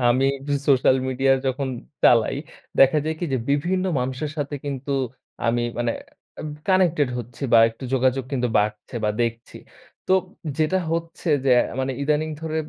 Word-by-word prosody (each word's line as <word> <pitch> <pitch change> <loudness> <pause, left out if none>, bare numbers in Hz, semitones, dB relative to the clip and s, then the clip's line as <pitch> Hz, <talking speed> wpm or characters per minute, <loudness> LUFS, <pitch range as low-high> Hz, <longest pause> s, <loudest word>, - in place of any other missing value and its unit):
আমি 130 +3 +3
একটু 140 +2 -5 0.2
social 130 -1 +5
media 135 +1 +2
যখন 130 +1 -1 0.3
চালাই, 120 +2 +5 0.4
দেখা 135 +3 +6
যায় 160 0 -1
কি? - - -2
যে 130 - +2
বিভিন্ন 180 +6 +1 0.2
মানুষের 130 +4 -3
সাথে 145 -1 -3
কিন্তু 140 0 -3 0.5
আমি 120 +1 +2 0.2
মানে 120 -1 +1 0.5
এব 155 - -5 0.2
কানেক্টেড 175 -7 +3
হচ্ছি 120 +3 -9
বা, 115 - +8
একটু 115 +4 -11
যোগাযোগ 130 0 +1
কিন্তু 125 -2 0
বাড়ছে 105 +3 -2
বা, 105 - +2
দেখছি। 115 0 -4 0.5
তোব 190 0 +3 0.4
যেটা 155 +4 +2
হচ্ছে 165 +1 -3 0.2
যে 135 - +3 0.3
মানে 130 0 -1
ইদানিং 150 +2 +1
ধরে 160 -1 -3
135 Hz, 155 wpm, -23 LUFS, 125-155 Hz, 0.5 s, বা